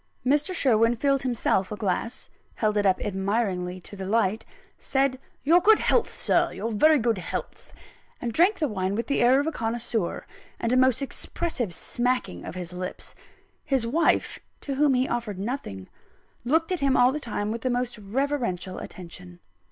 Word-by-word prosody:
Mr. 295 +7 +2
Sherwin 235 -8 +3
filled 275 +2 +1
himself 230 -6 0
a - - -2
glass 210 +3 -1 0.2
held 215 -1 0
it 205 -1 +2
up 185 - +2
admiringly 190 -2 -1
to 205 - -9
the 190 -1 -6
light 220 0 +1 0.3
said, 270 -1 0 0.2
"Your 335 +5 +5
good 430 +3 +6
health, 475 - +1
Sir, - - +3
your 230 - -4
very 305 +9 +5
good 230 -5 0
health;" 170 - -6 0.5
and 235 -2 -3
drank 375 - +4
the 305 - 0
wine 195 -4 -2
with 230 - -2
the 280 - 0
air 250 +3 +5
of 285 - 0
a 320 - 0
connoisseur, 225 - -2 0.3
and 230 - -1
a - - +3
most 260 +1 +3
expressive 270 - -3
smacking 240 - -2
of - - -7
the 180 -1 -6
lips. 180 0 -6 0.5
His 265 -4 0
wife 310 +9 +1 0.2
(to 280 - -4
whom 280 0 +3
he 255 +1 +1
offered 235 -5 -3
nothing) 190 - -5 0.6
looked 320 +8 +1
at 365 - 0
him 275 -1 +2
all 245 +1 +5
the 300 - -3
time 210 -5 -3
with 230 +1 -4
the 255 - -1
most 245 -2 -2
reverential 210 -5 -2
attention. 180 0 -10
235 Hz, 175 wpm, -26 LUFS, 200-275 Hz, 0.6 s, good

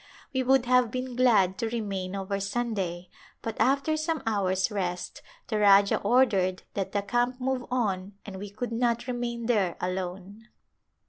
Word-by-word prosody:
We 260 - +1
would 260 0 +3
have 250 -1 +4
been 255 +1 -4
glad 210 -7 +3
to 230 -2 -1
remain 200 -5 -3
over 195 0 -2
Sunday 200 -5 -3 0.3
but 225 -1 -3
after 280 +4 +2
some 310 +1 -2
hours' 190 -2 +1
rest 180 -3 -3 0.2
the 215 -4 -1
Rajah 200 -1 +5
ordered 195 -8 +2
that 195 -2 -3
the 205 -1 -1
camp 240 +4 0
move 255 -1 -2
on 205 -6 -1
and 195 -2 -7
we 200 +1 -7
could 220 +4 -5
not 235 0 0
remain 240 -2 -3
there 205 -7 +1
alone. 185 +4 -5
215 Hz, 155 wpm, -27 LUFS, 195-245 Hz, 0.3 s, Rajah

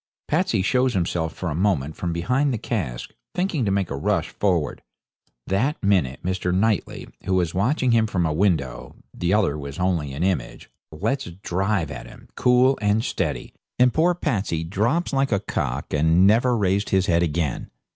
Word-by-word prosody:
Patsey 150 - +1
shows 125 +2 +2
himself 85 -2 -1
for 90 -3 -4
a - - -1
moment 80 -4 0
from 85 - -3
behind 125 - +1
the 120 - -1
cask, 80 - -4 0.2
thinking 180 - 0
to 100 - +1
make 95 -4 0
a - - -2
rush 70 - 0
forward; 90 -7 -1 0.6
that 115 +11 0
minute 90 -10 +1
Mr. 90 0 -1
Knightley, 105 +2 0 0.2
who 95 - +1
was 85 -3 +1
watching 125 - +1
him 115 -1 +3
from 90 -5 0
a 80 - 0
window 80 -7 -1 0.2
(the 85 0 -1
other 95 -8 +2
was 70 +1 -7
only 90 -6 0
an 75 +5 -3
image), 90 -10 -2 0.2
lets 115 - -2 0.2
drive 95 -3 0
at - - -7
him, - - -15
cool 125 +2 +3
and 105 +2 +2
steady, - - -3 0.2
and 125 0 +4
poor 175 +3 +3
Patsey 100 - -1
drops 115 - 0
like 135 -1 +1
a 100 - +2
cock, 100 - -3
and 80 +5 +4
never 120 +4 +4
raised 100 0 +1
his 95 -1 +2
head 85 -2 +2
again. 80 -4 -1
95 Hz, 175 wpm, -23 LUFS, 85-115 Hz, 0.6 s, and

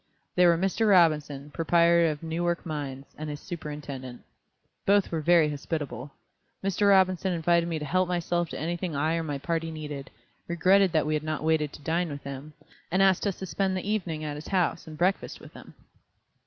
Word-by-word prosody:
They 180 0 +5
were 170 -1 +5
Mr. 195 +5 +1
Robinson, 150 -6 +3
proprietor 170 +1 +4
of 150 +1 -5
Newark 170 +2 -1
Mines, 140 -4 -5
and 155 0 -4
his 145 -1 -5
superintendent. 145 -7 -7 0.6
Both 200 0 +3
were 165 -2 -1
very 170 0 +5
hospitable. 145 -3 -4 0.5
Mr. 195 +1 +2
Robinson 190 -1 +3
invited 170 0 +2
me 165 - -1
to 150 - -4
help 185 +4 +1
myself 175 -1 -1
to - - -6
anything 170 +1 -3
I 155 +3 +1
or - - -1
my 145 -3 -3
party 165 +3 -2
needed, 150 -3 -6 0.4
regretted 185 +3 +4
that 155 - +2
we 155 - 0
had 150 - 0
not 155 0 -3
waited 155 -2 +1
to 145 - -12
dine 170 +3 0
with 145 -1 -7
him, 140 +2 -8 0.4
and 185 +3 +3
asked 190 +1 +3
us 195 - -2
to 190 - -5
spend 190 +3 -1
the 185 - -5
evening 180 -7 -2
at 150 -1 -4
his 150 - -9
house 180 -3 0
and 155 -1 -9
breakfast 185 +4 0
with - - -14
him. - - -13
165 Hz, 195 wpm, -27 LUFS, 150-180 Hz, 0.6 s, They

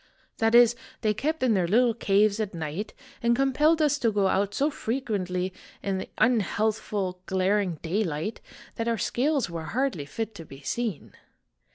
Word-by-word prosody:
That 225 +1 +3
is, 240 -1 +7 0.3
they 215 -3 +2
kept 305 +7 -2
in 245 -3 +4
their 185 -4 +2
little 235 +5 +4
caves 205 -1 +2
at 205 -4 -2
night, 165 +5 -4 0.3
and 235 0 +3
compelled 295 +5 +3
us 295 -1 +2
to 230 -4 +2
go 200 -2 +2
out 200 +1 0
so 290 +3 +1
frequently 210 - -2 0.3
in 195 -1 -1
the - - -6
unhealthful, 210 -4 0
glaring 190 -1 +1
daylight, 175 +1 -2 0.4
that 230 - -2
our 230 -1 +1
scales 270 +2 +1
were 165 -2 -6
hardly 225 - -1
fit 220 +8 -4
to 170 - -9
be 135 -3 -12
seen. 225 - -3
215 Hz, 165 wpm, -27 LUFS, 190-240 Hz, 0.4 s, is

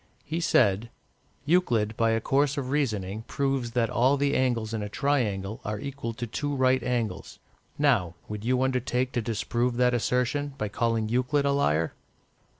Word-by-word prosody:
He 160 +3 -2
said 115 - +2 0.6
"Euclid, 120 -11 +2
by 115 0 +2
a 115 0 +2
course 140 +5 +1
of 130 -2 -3
reasoning, 110 -8 -1
proves 135 -4 -1
that 115 -2 +1
all 130 +5 +3
the 140 +1 +1
angles 115 -4 0
in 110 - -2
a 105 - -4
triangle 110 -6 -1
are 105 0 -3
equal 130 -3 -5
to 120 - -4
two 145 +5 -3
right 130 -1 +3
angles; 115 -6 -3 0.4
now, 115 - +2
would 105 0 -6
you 125 +2 +1
undertake 125 -1 0
to 120 - -1
disprove 120 +2 -1
that 125 0 +3
assertion 125 +4 0
by 105 - -2
calling 115 +1 0
Euclid 125 +5 +1
a 140 - +3
liar?" 80 - +1
125 Hz, 165 wpm, -27 LUFS, 110-135 Hz, 0.6 s, all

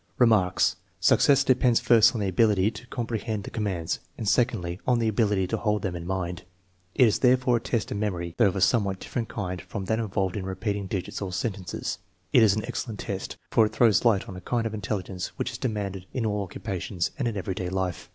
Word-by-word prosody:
Remarks. 95 -6 +3 0.2
Success 140 +9 +5
depends 125 -3 +3
first 115 +1 +5
on 110 - -1
the 100 - 0
ability 100 +1 +3
to 115 +3 -11
compre 115 -3 -3
hend 110 -3 -3
the - - -8
commands, 95 -7 -2 0.2
and 110 - -4
secondly, 100 -7 +1
on 125 -1 +4
the 115 -1 +1
ability 105 -3 +2
to 90 - -2
hold 105 -2 0
them 90 -3 -2
in 85 0 -6
mind. 90 -2 -3 0.5
It 125 - +6
is 105 - +1
therefore 125 -1 +4
a - - -5
test 115 -1 -2
of - - -2
memory, 90 -5 -2
though 115 - +6
of 95 - -1
a 95 - -1
somewhat 100 -2 +2
different 115 -3 -4
kind 90 -4 -4
from 100 -3 -6
that 110 +3 0
involved 95 -3 -1
in 100 - -3
repeat 100 +2 -2
ing 100 -1 -4
digits 95 +1 -4
or 95 -2 -3
sentences. 95 0 -3 0.3
It 125 - +7
is 105 -3 +5
an 110 - -2
excellent 110 -4 -4
test, 95 -1 -5
for 110 - +5
it - - -10
throws 115 -5 +4
light 110 -5 +3
on 95 - -7
a 90 - -8
kind 115 +4 -1
of 110 - -3
intelligence 95 -3 -3
which - - -2
is - - -7
demanded 100 -5 -3
in 125 -3 -1
all 105 -1 0
occupations 95 -2 -3
and 130 - 0
in 110 -3 -2
everyday 95 -1 -3
life. 90 -2 -3
105 Hz, 225 wpm, -26 LUFS, 95-115 Hz, 0.5 s, It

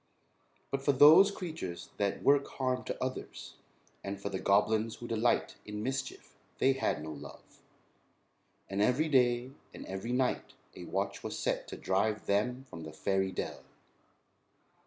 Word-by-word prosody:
But 135 - -1
for 140 +1 +3
those 155 +8 +8
creatures 160 - -6
that 100 -1 -1
work 140 0 +4
harm 130 -1 -2
to - - -4
others, 130 0 -5 0.5
and 100 0 -4
for 100 - -4
the 95 -1 -3
goblins 110 +3 +2
who 120 - -8
delight 115 +1 +1
in 105 0 -5
mischief 135 +2 -4 0.2
they 135 - +4
had 135 - -1
no 80 - -5
love, 70 -1 -12 1.1
and 100 +1 -2
every 130 +9 +2
day 125 -2 +3 0.2
and - - -8
every 95 +5 -5
night 125 0 0 0.2
a - - -8
watch - - -2
was - - -5
set - - -1
to - - -7
drive 105 +3 0
them 125 +6 0
from 85 - -9
the 80 -1 -8
fairy 95 +4 0
dell. - - -5
120 Hz, 155 wpm, -32 LUFS, 100-130 Hz, 1.1 s, those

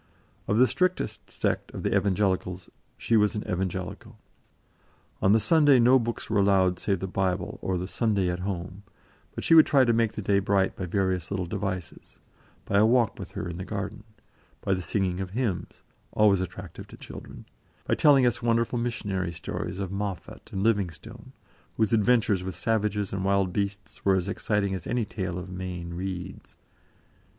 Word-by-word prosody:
Of 105 - +1
the 125 - +7
strictest 180 +9 -1
sect - - -2
of - - -5
the - - +1
Evangelicals, 95 -2 0 0.3
she 115 - +1
was 105 0 +3
an 105 - -2
Evangelical. 95 +4 -4 1.0
On 95 - +4
the 110 - +5
Sunday 145 +3 +5
no 125 +2 +6
books 115 -1 -4
were 110 -1 +1
allowed 95 -2 +3
save 95 -4 -1
the 95 - -2
Bible 95 -1 -2
or 95 -1 -1
the 90 +1 -4
"Sunday 100 -3 0
at 90 0 -2
Home"; 90 0 -5 0.5
but - - -5
she - - +3
would 160 -1 +8
try 135 -3 +5
to 120 - +3
make 115 -1 +1
the 105 - -5
day 100 0 +3
bright 95 0 +1
by 95 - -4
various 95 -2 -1
little 95 -2 -2
devices; 95 -2 -5 0.5
by 100 - +2
a 105 - +6
walk 120 -1 +2
with - - -8
her - - -4
in 85 -1 -5
the - - -4
garden; 100 +2 -5 0.6
by 95 - 0
the 95 - -1
singing 90 -1 -1
of 95 - -4
hymns, 115 -9 -3 0.3
always 100 -3 +4
attractive 95 - -7
to - - -13
children; - - -10 0.4
by - - 0
telling 140 -4 +5
us 120 0 +1
wonderful 115 +1 +1
missionary 100 -7 -2
stories 85 +2 -5
of 95 -2 -4
Moffat 100 -2 -5
and 95 - -2
Livingstone, 100 -8 -2 0.5
whose 110 +1 +1
adventures 110 -4 +3
with 95 0 -5
savages 105 -3 -1
and 95 -1 -2
wild 100 -2 +1
beasts 100 -1 -4
were 95 -1 +4
as 95 0 -1
exciting 100 0 -1
as 90 -3 -5
any 120 -1 0
tale 95 -4 -4
of 90 +1 -7
Mayne 90 -2 -5
Reid's. 95 +1 -6
100 Hz, 180 wpm, -27 LUFS, 95-110 Hz, 1.0 s, would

